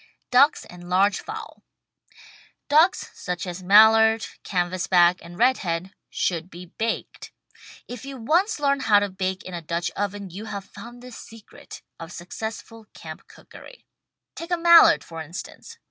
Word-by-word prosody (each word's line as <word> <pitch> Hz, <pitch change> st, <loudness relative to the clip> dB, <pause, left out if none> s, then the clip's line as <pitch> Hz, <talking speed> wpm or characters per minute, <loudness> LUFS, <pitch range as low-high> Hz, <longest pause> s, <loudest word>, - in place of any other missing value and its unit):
DUCKS 280 Hz, +4 st, +4 dB
AND 175 Hz, 0 st, -13 dB
LARGE 195 Hz, +3 st, +2 dB
FOWL -, -, -9 dB, 1.1 s
Ducks, 315 Hz, +6 st, +3 dB
such 180 Hz, 0 st, -5 dB
as 180 Hz, 0 st, -7 dB
Mallard, 220 Hz, +3 st, +5 dB, 0.2 s
Canvasback 180 Hz, -1 st, +1 dB
and 175 Hz, +1 st, -12 dB
Redhead, 190 Hz, -7 st, 0 dB, 0.2 s
should 170 Hz, 0 st, -2 dB
be 180 Hz, 0 st, -11 dB
baked. 220 Hz, +6 st, -5 dB, 0.6 s
If 245 Hz, -1 st, -9 dB
you 275 Hz, 0 st, -8 dB
once 335 Hz, -, 0 dB
learn 280 Hz, -1 st, +1 dB
how 215 Hz, -5 st, +3 dB
to 205 Hz, 0 st, +1 dB
bake 185 Hz, 0 st, -4 dB
in 185 Hz, -, -9 dB
a 170 Hz, -, -5 dB
Dutch 170 Hz, +2 st, -3 dB
Oven 200 Hz, -1 st, -4 dB
you 200 Hz, +5 st, -8 dB
have 200 Hz, -2 st, -7 dB
found 240 Hz, +3 st, -13 dB
the 250 Hz, -, -11 dB
secret 225 Hz, -2 st, -13 dB, 0.2 s
of 165 Hz, 0 st, -9 dB
successful 220 Hz, +5 st, -8 dB
camp 155 Hz, -1 st, -11 dB
cookery. -, -, -16 dB, 0.5 s
Take 335 Hz, -, -9 dB
a 350 Hz, -, 0 dB
Mallard, 335 Hz, 0 st, +6 dB
for 165 Hz, -1 st, -9 dB
instance. 180 Hz, -, -10 dB
205 Hz, 145 wpm, -23 LUFS, 180-245 Hz, 1.1 s, Mallard